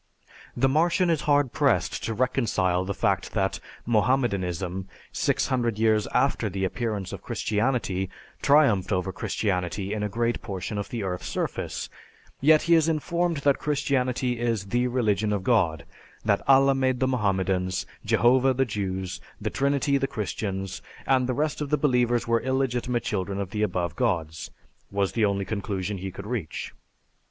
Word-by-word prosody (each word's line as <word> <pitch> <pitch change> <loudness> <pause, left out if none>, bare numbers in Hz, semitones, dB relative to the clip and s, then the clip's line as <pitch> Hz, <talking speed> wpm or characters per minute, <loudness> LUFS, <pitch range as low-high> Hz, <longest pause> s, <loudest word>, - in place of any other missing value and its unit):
The 135 +2 +4
Martian 170 +5 +2
is 160 -3 +1
hard 145 -3 +3
pressed - - +1
to 115 - -2
reconcile 105 -7 +1
the 100 +1 -3
fact - - 0
that - - 0 0.3
Mohammedanism 95 -6 0 0.2
six - - +1
hundred 120 -5 0
years 110 -1 +2
after 130 -5 +1
the 95 0 -2
appearance 105 -2 -3
of - - -6
Christianity 105 -4 -1 0.3
triumphed 140 -10 +4
over 95 0 0
Christianity 95 0 -2
in 105 - -2
a 105 - -1
great 115 +3 -1
portion 100 +1 -4
of 100 - -5
the 120 -5 -3
earth's 90 -1 -3
surface; - - -3 0.5
yet 155 +2 +5
he 170 - +3
is 165 -1 +4
informed 170 +2 0
that 140 -1 +4
Christianity 130 -4 0
is 115 -4 0
the 120 +5 +1
religion 110 -4 +1
of 100 -2 -1
God, 85 - +2 0.4
that 100 -2 +2
Allah 135 0 +6
made 130 -2 +1
the 130 - +2
Mohammedans, 95 -6 0 0.2
Jehovah 130 +4 +4
the 135 +1 +2
Jews, 95 -4 -3 0.2
the - - -3
Trinity 140 0 +1
the 135 - 0
Christians, 100 -5 -4 0.2
and 130 -2 +3
the 130 - -1
rest 150 0 -1
of 145 - -2
the 150 - +2
believers 125 -4 +2
were 115 0 +2
illegitimate 125 -2 0
children 100 -1 -2
of 100 -2 -4
the 105 - -2
above 90 -5 -1
gods, 80 -3 -1 0.4
was 100 -1 0
the 115 -2 +2
only 100 -1 0
conclusion 100 -2 -3
he 95 +1 -4
could 95 - -9
reach. 105 -8 -4
115 Hz, 160 wpm, -26 LUFS, 95-130 Hz, 0.5 s, Allah